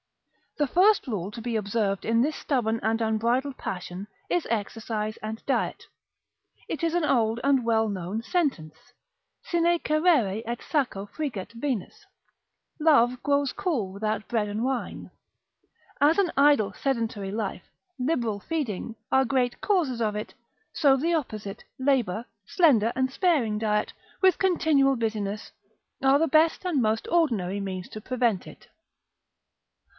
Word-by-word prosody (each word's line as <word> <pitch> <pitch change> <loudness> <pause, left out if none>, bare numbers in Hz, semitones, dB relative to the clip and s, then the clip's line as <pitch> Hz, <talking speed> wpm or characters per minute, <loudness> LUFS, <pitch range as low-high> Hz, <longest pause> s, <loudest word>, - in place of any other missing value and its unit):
The 295 - +2
first 390 +9 +4
rule 200 -6 -3
to 230 - -8
be 235 0 -3
observed 205 -2 -1
in 230 +1 +3
this 300 +5 0
stubborn 230 -5 0
and 225 +1 +1
unbridled 235 +5 0
passion, 185 +1 -6 0.2
is 355 -2 0
exercise 215 0 -2
and 220 +1 -7
diet. 270 - -1 0.8
It - - -4
is 330 -1 +1
an 345 -2 +1
old 230 -4 +2
and 275 -2 +3
well 225 -1 +2
known, 195 +1 -3
sentence, 235 - -2 0.5
Sine 345 0 +2
Cerere 305 - +2
et 235 +1 -3
Saccho 245 -10 -2
friget 240 -9 -5
Venus 235 -4 -4 0.7
(love 250 -6 +4
grows 285 -1 +1
cool 240 - -2
without 215 +1 -2
bread 220 -4 0
and 210 +3 -2
wine). 260 -1 -3 0.9
As 300 +3 +5
an 385 -4 +2
idle 280 -7 +4
sedentary 230 -7 -2
life, 210 -2 -4 0.3
liberal 245 -6 0
feeding, 235 - -3 0.2
are 265 0 +5
great 250 -1 0
causes 315 - +1
of 210 -2 0
it, 210 - -5 0.4
so 275 -4 +4
the 330 +6 0
opposite, 215 -10 -4 0.2
labour, 245 -6 +1 0.2
slender 235 - +4
and 260 0 0
sparing 275 - +1
diet, 210 -1 0 0.3
with 375 -2 +4
continual 310 -7 +3
business, 215 -3 -3 0.5
are 270 +1 +5
the 325 - +2
best 320 +4 +3
and 325 -7 +1
most 220 0 0
ordinary 220 - +1
means 190 -2 -5
to 215 - -8
prevent 235 -5 0
it. - - -14
235 Hz, 140 wpm, -26 LUFS, 215-290 Hz, 0.9 s, As